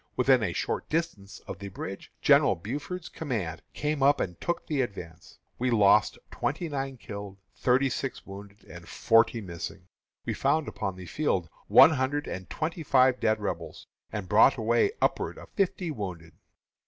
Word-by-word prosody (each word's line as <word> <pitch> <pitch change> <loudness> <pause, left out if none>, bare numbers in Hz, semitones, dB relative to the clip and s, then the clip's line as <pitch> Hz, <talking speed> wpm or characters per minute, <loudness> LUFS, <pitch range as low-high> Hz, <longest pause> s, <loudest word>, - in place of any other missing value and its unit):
When 125 - +1
within 130 -3 +5
a 100 -5 0
short - - -3
distance 150 -12 -3
of 95 - -8
the 100 - -6
bridge, 95 0 -7
General - - +5
Buford's 145 - -5
command 105 - -4
came 150 0 -1
up 140 +1 +4
and 90 -2 -4
took 175 - -2
the 145 -4 0
advance. 90 -8 -7 0.2
We 125 +1 +1
lost 105 -3 +4
twenty 175 - -2
nine 135 -2 -4
killed, 100 -3 -8 0.2
thirty 130 +2 +2
six 135 0 -4
wounded, 100 +1 -11
and 85 0 -12
forty 115 0 +3
missing. 85 -4 -7 0.4
We - - -1
found 155 -1 +1
upon 95 -1 -4
the 90 0 -9
field 90 - -1 0.2
one - - +8
hundred 145 +1 -1
and 95 0 -6
twenty 165 +1 -3
five 130 -3 +4
dead 110 0 +1
Rebels, 90 -5 -5 0.3
and 105 -3 -5
brought 110 +8 +5
away 115 - +2
upward - - 0
of - - -12
fifty 190 -3 -1
wounded. 90 - -6
115 Hz, 165 wpm, -28 LUFS, 95-140 Hz, 0.4 s, one